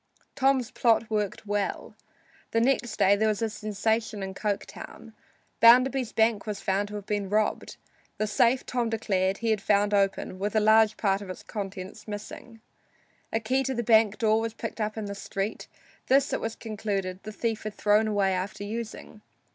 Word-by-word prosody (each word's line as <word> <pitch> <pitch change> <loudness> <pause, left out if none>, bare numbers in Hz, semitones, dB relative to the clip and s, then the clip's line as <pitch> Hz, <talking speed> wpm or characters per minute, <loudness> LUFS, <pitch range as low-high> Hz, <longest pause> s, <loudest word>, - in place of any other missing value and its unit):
Tom's 265 -3 +1
plot 230 -2 +2
worked 210 -1 -2
well. 205 -1 -2 0.6
Next 235 -1 +1
day 200 +2 +5
there 220 +2 +1
was 215 +1 0
a 220 - -1
sensation 215 0 -1
in 190 0 -5
Coketown. 210 +2 -5 0.5
Bounderby's 250 +1 +5
bank 220 -1 +1
was 210 -2 -3
found 195 +1 0
to 210 - -8
have 205 -2 -6
been 205 -2 -2
robbed. 215 +1 -1 0.4
The 215 - 0
safe, 235 +4 +2
Tom 245 -2 -1
declared, 195 -4 0
he 230 -1 0
had 215 -2 0
found 205 +1 +2
open, 195 -2 0
with 205 +2 -2
a - - +5
large 215 0 +4
part 195 -1 +1
of 200 - -9
its 185 - -7
contents 195 -2 -7
missing. 215 +2 -8 0.7
A 225 - +1
key 255 +4 0
to 265 0 -2
the 240 - -1
bank 220 -2 +4
door 220 -2 +3
was 225 0 -4
picked 225 0 -5
up 215 +1 -2
in 220 - -3
the 200 - -5
street; 200 +1 -4 0.4
this, 275 +1 +3
it - - -1
was 225 0 -3
concluded, 200 -4 -4
the 215 - -7
thief 225 0 -2
had 215 -1 -6
thrown 210 +1 +3
away 200 -3 +1
after 185 +2 -4
using. 220 0 -6
215 Hz, 180 wpm, -27 LUFS, 200-225 Hz, 0.7 s, day